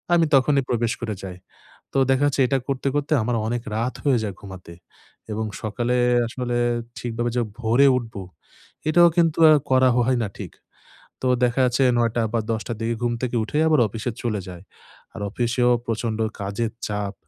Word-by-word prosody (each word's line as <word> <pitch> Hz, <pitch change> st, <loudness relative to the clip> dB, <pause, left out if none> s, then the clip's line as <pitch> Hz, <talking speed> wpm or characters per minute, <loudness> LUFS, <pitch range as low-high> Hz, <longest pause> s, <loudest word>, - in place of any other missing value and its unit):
আমি 165 Hz, -1 st, +4 dB
তখনই 135 Hz, +1 st, +3 dB
প্রবেশ 120 Hz, -1 st, 0 dB
করে 110 Hz, -2 st, -3 dB
যাই। 90 Hz, -2 st, -7 dB, 0.6 s
তো -, -, 0 dB
দেখা 135 Hz, +2 st, +3 dB
যাচ্ছে 145 Hz, -1 st, 0 dB
এটা 135 Hz, +2 st, +1 dB
করতে, 135 Hz, 0 st, -1 dB
করতে 145 Hz, +1 st, -1 dB
আমার 120 Hz, +2 st, -1 dB
অনেক 120 Hz, 0 st, -2 dB
রাত 120 Hz, +3 st, -1 dB
হয়ে 135 Hz, -4 st, +3 dB
যায় 100 Hz, -3 st, -4 dB
ঘুমাতে। 95 Hz, -3 st, -11 dB, 0.6 s
এবং 110 Hz, +1 st, -2 dB, 0.2 s
সকালে 120 Hz, +3 st, -1 dB, 0.3 s
আসলে 120 Hz, +1 st, -3 dB, 0.4 s
ঠিকভাবে 120 Hz, 0 st, -2 dB
যে 120 Hz, -, +2 dB, 0.2 s
ভোরে 120 Hz, +4 st, +4 dB
উঠব, 120 Hz, -2 st, -5 dB, 0.7 s
এটাও 175 Hz, +2 st, +6 dB
কিন্তু 165 Hz, -2 st, +2 dB
আ -, -, +8 dB, 0.2 s
করা 130 Hz, 0 st, +5 dB
হয় 125 Hz, +1 st, +2 dB
না 110 Hz, -, -2 dB
ঠিক। -, -, -7 dB, 0.7 s
তো -, -, -1 dB, 0.2 s
দেখা 125 Hz, +2 st, +1 dB
যাচ্ছে 125 Hz, +2 st, +2 dB
৯ঃ০০ 120 Hz, 0 st, +1 dB
বা 115 Hz, -, +2 dB
১০ঃ০০ 110 Hz, +1 st, -4 dB
দিকে 115 Hz, +1 st, -1 dB
ঘুম 120 Hz, 0 st, +1 dB
থেকে 125 Hz, -1 st, -1 dB
উঠেই 150 Hz, +7 st, 0 dB
আবার 155 Hz, -4 st, +4 dB
অফিসে 115 Hz, +4 st, -4 dB
চলে 110 Hz, -4 st, -1 dB
যাই। 90 Hz, -1 st, -9 dB, 0.5 s
আর -, -, -8 dB
অফিসেও 120 Hz, +2 st, +1 dB, 0.2 s
প্রচন্ড 115 Hz, -1 st, -2 dB, 0.2 s
কাজের 100 Hz, +3 st, -3 dB, 0.2 s
চাপ। 105 Hz, -1 st, -3 dB
120 Hz, 175 wpm, -23 LUFS, 110-130 Hz, 0.7 s, আ